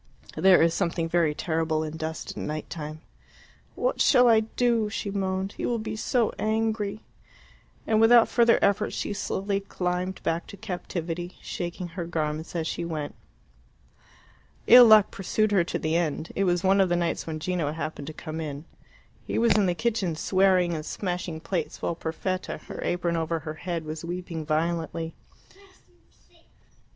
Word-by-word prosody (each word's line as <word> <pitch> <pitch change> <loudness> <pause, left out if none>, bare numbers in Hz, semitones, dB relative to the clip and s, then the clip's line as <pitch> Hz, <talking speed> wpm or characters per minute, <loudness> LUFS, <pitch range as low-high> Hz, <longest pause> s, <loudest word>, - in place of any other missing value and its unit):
There 190 -3 +6
is 165 0 +3
something 170 -3 -1
very 165 -3 +1
terrible 160 -1 -1
in 155 0 -5
dust 160 0 -5
at - - -11
night 155 0 -4
time. 155 -1 -6 0.7
"What - - 0
shall 250 -3 +6
I 225 -2 +6
do?" 225 0 0
she 205 -1 -4
moaned. 190 0 -2
"He - - -2
will 240 - 0
be 220 -1 -4
so 230 +1 0
angry." 215 -1 -1 0.8
And 220 0 +2
without 230 +1 +7
further 235 -1 +4
effort 205 +1 +2
she - - -3
slowly 200 0 -2
climbed 180 -1 -3
back 165 +1 -1
to 200 - -10
captivity, 175 -3 -5
shaking 175 0 -5
her 170 0 -5
garments 155 0 -3
as 165 -2 -1
she 170 - -3
went. 155 -3 -4 1.5
Ill 245 +1 +10
luck 215 -2 +7
pursued 215 +2 0
her 195 -4 +4
to - - -2
the 155 +1 -1
end. 160 -1 -1
It 195 - +1
was 175 0 +1
one 195 +1 +4
of 190 - +2
the 175 - +2
nights 170 -1 -1
when 155 -1 -4
Gino 170 -3 -1
happened 155 -2 -5
to - - -4
come 155 +1 -6
in. 150 0 -6 0.6
He - - -2
was 235 0 +4
in 205 -2 +3
the 175 - +1
kitchen, 210 -6 -1
swearing 185 0 +3
and 155 -2 -3
smashing 175 -2 -4
plates, 165 -1 -3
while - - -1
Perfetta, 170 +3 -3
her - - -10
apron 175 -1 0
over 165 0 -1
her 155 0 -5
head, 170 0 -4
was 155 +1 -6
weeping 170 -2 -5
violently. 165 +1 -1
175 Hz, 165 wpm, -26 LUFS, 160-200 Hz, 1.5 s, Ill